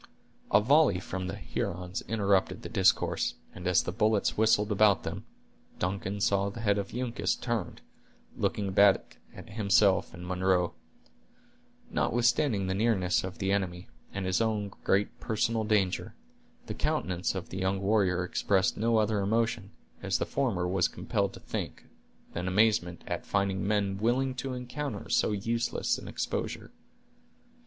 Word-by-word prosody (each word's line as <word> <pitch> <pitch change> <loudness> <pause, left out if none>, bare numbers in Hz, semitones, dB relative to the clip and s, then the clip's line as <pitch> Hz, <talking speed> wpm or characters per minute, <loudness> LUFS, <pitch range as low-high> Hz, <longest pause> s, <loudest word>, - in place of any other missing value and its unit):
A - - +7
volley 135 - +4
from 95 0 -5
the 95 - -4
Hurons 90 0 -4
interrupted 100 -3 +1
the - - -6
discourse, - - +2 0.2
and 90 - -6
as 90 - +4
the - - -3
bullets 105 +1 +1
whistled 105 -1 +3
about 105 -1 +4
them, - - -5 0.5
Duncan 95 +2 -2
saw 100 0 +2
the 115 +3 -8
head 100 -2 +2
of 100 - -5
Uncas 125 -1 -1
turned, 120 -3 -3 0.5
looking 100 -2 -1
back 100 0 +4 0.2
at - - -11
himself 100 -2 +3
and 90 +1 -9
Munro. 90 -1 +1 1.2
Notwithstanding 120 -3 +2
the 95 - -1
nearness 95 -3 +1
of 95 0 -6
the 95 0 -1
enemy, 90 -3 -2 0.2
and 100 -1 -4
his 95 +3 +1
own 105 -2 0
great 100 +1 +1
personal 110 +1 0
danger, 105 -4 0 0.5
the - - -4
countenance 90 +1 -1
of 95 - -5
the 95 - -5
young 95 +1 0
warrior 95 -3 +2
expressed 95 +1 +1
no 115 +1 +2
other 110 -1 +2
emotion, 110 0 0 0.3
as - - 0
the - - -1
former 115 -11 -1
was 90 -1 +2
compelled - - -2
to - - -10
think, - - -5 0.5
than 90 +2 -3
amazement 95 -3 +2
at - - -3
finding 100 -1 0
men 100 -2 0
willing 130 +4 +1
to 130 0 -4
encounter 125 -1 -5
so - - +2
useless 115 +3 -1
an - - -10
exposure. - - -4
100 Hz, 150 wpm, -29 LUFS, 95-110 Hz, 1.2 s, A